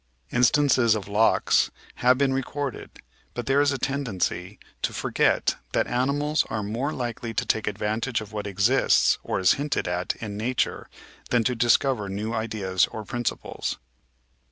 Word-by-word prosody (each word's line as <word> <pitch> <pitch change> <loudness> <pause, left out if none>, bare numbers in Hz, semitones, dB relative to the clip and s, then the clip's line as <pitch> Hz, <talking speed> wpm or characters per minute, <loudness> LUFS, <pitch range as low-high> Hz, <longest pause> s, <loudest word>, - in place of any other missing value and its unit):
Instances 125 -2 +4
of 105 -2 -5
"locks" 105 +2 +3 0.3
have 125 +1 +4
been 135 -1 +2
recorded, 135 0 -3 0.5
but 120 - -4
there 135 +1 +3
is 145 0 +3
a 135 - -1
tendency 105 -9 -2 0.2
to - - -1
forget - - +1 0.2
that - - +2
animals 145 +5 +1
are 110 -1 -2
more 115 +8 -2
likely 120 -4 -4
to - - 0
take 110 - 0
advantage 110 +4 -1
of 110 -1 -10
what 105 -1 -4
exists 100 +7 +3
or - - -2
is 95 - +5
hinted 150 +1 -1
at 90 +1 -1
in 105 -2 -6
Nature 120 +4 -1 0.4
than 120 -2 +3
to 125 - +1
discover 120 -2 +2
new 105 +4 -3
ideas 105 -5 0
or 110 - -7
principles 120 +3 -3
115 Hz, 155 wpm, -25 LUFS, 105-135 Hz, 0.5 s, is